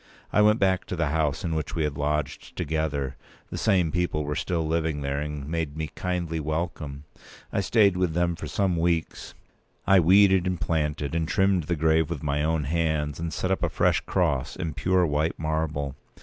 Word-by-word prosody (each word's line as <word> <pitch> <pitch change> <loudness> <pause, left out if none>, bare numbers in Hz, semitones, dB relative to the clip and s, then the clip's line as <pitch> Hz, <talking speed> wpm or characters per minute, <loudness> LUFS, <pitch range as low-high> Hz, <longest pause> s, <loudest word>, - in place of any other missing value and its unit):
I 105 - +5
went 105 +1 +5
back 95 -1 +2
to - - -4
the 80 -3 0
house 75 -2 0
in 85 -2 -1
which 80 -3 -3
we 80 - 0
had 75 -2 -1
lodged 75 0 -2
together. 70 -3 -2 0.3
The - - -4
same 90 -7 +2
people 90 -3 0
were 75 +1 -2
still 85 -3 -1
living 80 -2 -1
there, 70 0 -2
and 75 -1 -5
made 80 -2 -3
me 80 -1 -4
kindly 85 -3 -2
welcome. 75 -2 -3 0.5
I - - +1
stayed 100 -1 +4
with 90 -3 0
them 85 0 +1
for 80 - -7
some 90 +4 0
weeks. 85 -1 -1 0.5
I 95 -1 +6
weeded, 95 +1 +5
and 90 -2 -1
planted, 75 -3 -1
and 80 -1 0
trimmed 95 -2 +2
the 85 - 0
grave 80 0 +2
with 80 -4 -4
my 75 0 0
own 80 -1 +1
hands, 80 -1 -1
and 85 0 -3
set 95 - -2
up 95 - 0
a - - +1
fresh - - +2
cross 75 -9 0
in 85 -4 -4
pure 90 +4 +2
white 75 +1 0
marble. 80 -3 -2
80 Hz, 195 wpm, -26 LUFS, 75-90 Hz, 0.5 s, I